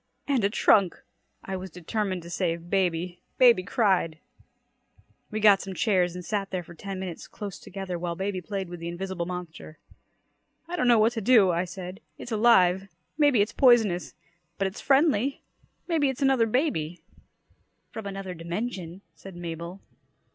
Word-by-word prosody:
"And 270 Hz, -6 st, +1 dB
a 200 Hz, -, +3 dB
trunk!" 200 Hz, -3 st, +3 dB, 0.4 s
I 190 Hz, -, -4 dB
was 190 Hz, 0 st, -6 dB
determined 185 Hz, +2 st, -3 dB
to 170 Hz, -, -10 dB
save 170 Hz, -1 st, -2 dB
baby. 180 Hz, -2 st, 0 dB, 0.2 s
Baby 240 Hz, -6 st, +6 dB
cried! 190 Hz, -6 st, +1 dB, 1.1 s
We 215 Hz, -, -3 dB
got 205 Hz, -2 st, +6 dB
some 195 Hz, -1 st, -6 dB
chairs 180 Hz, -6 st, +1 dB
and 180 Hz, -1 st, -7 dB
sat 200 Hz, -1 st, -2 dB
there 185 Hz, -2 st, -3 dB
for 175 Hz, -, -13 dB
ten 195 Hz, +3 st, -6 dB
minutes 185 Hz, -3 st, -6 dB
close 200 Hz, -3 st, -7 dB
together 190 Hz, -2 st, -6 dB
while 170 Hz, 0 st, -3 dB
baby 190 Hz, 0 st, -3 dB
played 195 Hz, +1 st, -4 dB
with 175 Hz, 0 st, -8 dB
the 170 Hz, -, -6 dB
invisible 175 Hz, 0 st, -4 dB
monster. 175 Hz, -3 st, -7 dB, 0.9 s
"I 350 Hz, -, -4 dB
don't 300 Hz, -8 st, +1 dB
know 240 Hz, -1 st, +6 dB
what 220 Hz, +2 st, +4 dB
to 225 Hz, -, -3 dB
do!" 215 Hz, -4 st, +5 dB
I 170 Hz, +2 st, 0 dB
said. 180 Hz, +1 st, -8 dB, 0.2 s
"It's 240 Hz, -, -9 dB
alive. 195 Hz, -4 st, +4 dB, 0.3 s
Maybe 290 Hz, -7 st, +5 dB
it's 205 Hz, -, 0 dB
poisonous. 220 Hz, -, +3 dB, 0.4 s
But 195 Hz, -, 0 dB
it's 190 Hz, +2 st, -4 dB
friendly. 275 Hz, -2 st, +2 dB, 0.4 s
Maybe 315 Hz, -5 st, +2 dB
it's 265 Hz, +1 st, -3 dB
another 265 Hz, -4 st, +4 dB
baby!" 215 Hz, -, -1 dB, 0.9 s
"From 220 Hz, -2 st, -6 dB
another 195 Hz, -2 st, -5 dB
dimension," 175 Hz, +1 st, -5 dB
said 195 Hz, -2 st, -12 dB
Mabel. 170 Hz, +2 st, -6 dB
190 Hz, 160 wpm, -27 LUFS, 175-220 Hz, 1.1 s, Baby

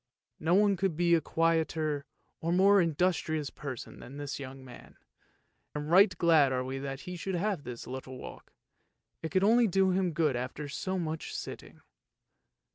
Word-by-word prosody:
No 165 Hz, +3 st, +2 dB
one 200 Hz, -1 st, +4 dB
could 180 Hz, -3 st, -1 dB
be 170 Hz, 0 st, +3 dB
a 165 Hz, -, +4 dB
quieter 160 Hz, -3 st, 0 dB, 0.3 s
or 165 Hz, -, -2 dB
more 195 Hz, +2 st, +5 dB
industrious 160 Hz, -2 st, 0 dB
person 135 Hz, -5 st, -7 dB
than 135 Hz, +3 st, -10 dB
this 145 Hz, -1 st, -5 dB
young 135 Hz, -1 st, -8 dB
man, 125 Hz, -2 st, -13 dB, 0.8 s
and 150 Hz, +1 st, -4 dB
right 190 Hz, +1 st, +6 dB
glad 160 Hz, -5 st, +5 dB
are 130 Hz, -1 st, 0 dB
we 130 Hz, +1 st, -4 dB
that 135 Hz, 0 st, -5 dB
he 180 Hz, -1 st, -7 dB
should 185 Hz, +2 st, -3 dB
have 195 Hz, -1 st, -1 dB
this 120 Hz, -1 st, -7 dB
little 130 Hz, 0 st, -7 dB
walk, -, -, -10 dB, 0.7 s
it 160 Hz, -, -3 dB
could 190 Hz, +1 st, +1 dB
only 230 Hz, +3 st, +5 dB
do 190 Hz, 0 st, +3 dB
him 180 Hz, -2 st, +1 dB
good 155 Hz, -4 st, +1 dB
after 130 Hz, +4 st, -4 dB
so 185 Hz, +7 st, -3 dB
much 160 Hz, -2 st, -4 dB
sitting. -, -, -8 dB
160 Hz, 170 wpm, -30 LUFS, 140-185 Hz, 0.8 s, right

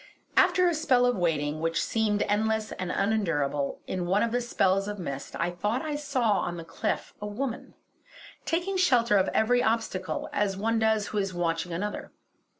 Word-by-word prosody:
After 365 Hz, -1 st, +5 dB
a 345 Hz, -, +2 dB
spell 270 Hz, -6 st, +3 dB
of 245 Hz, 0 st, +2 dB
waiting, 155 Hz, -4 st, 0 dB
which 165 Hz, 0 st, 0 dB
seemed 215 Hz, -2 st, +1 dB
endless 220 Hz, +1 st, 0 dB
and 180 Hz, -1 st, -4 dB
unendurable, 165 Hz, -10 st, 0 dB
in 180 Hz, -2 st, -3 dB
one 195 Hz, +3 st, +3 dB
of 235 Hz, -, 0 dB
the 245 Hz, +1 st, +1 dB
spells 195 Hz, -4 st, +1 dB
of 210 Hz, 0 st, -4 dB
mist 140 Hz, -7 st, -6 dB
I 175 Hz, +1 st, 0 dB
thought 210 Hz, -, -1 dB
I 305 Hz, -2 st, -2 dB
saw 260 Hz, -8 st, +1 dB
on 175 Hz, 0 st, -3 dB
the 165 Hz, -, -6 dB
cliff -, -, -3 dB
a 210 Hz, -, -3 dB
woman, 235 Hz, +3 st, -4 dB, 0.7 s
taking 355 Hz, +4 st, -1 dB
shelter 245 Hz, -, +4 dB
of 190 Hz, -, +3 dB
every 245 Hz, +3 st, +2 dB
obstacle, 220 Hz, -5 st, -1 dB
as 205 Hz, -1 st, +1 dB
does 190 Hz, -, -8 dB
one 225 Hz, +2 st, +1 dB
who 220 Hz, -1 st, +1 dB
is 195 Hz, -2 st, -2 dB
watching 170 Hz, 0 st, -1 dB
another. 205 Hz, +5 st, -4 dB
210 Hz, 180 wpm, -27 LUFS, 180-240 Hz, 0.7 s, After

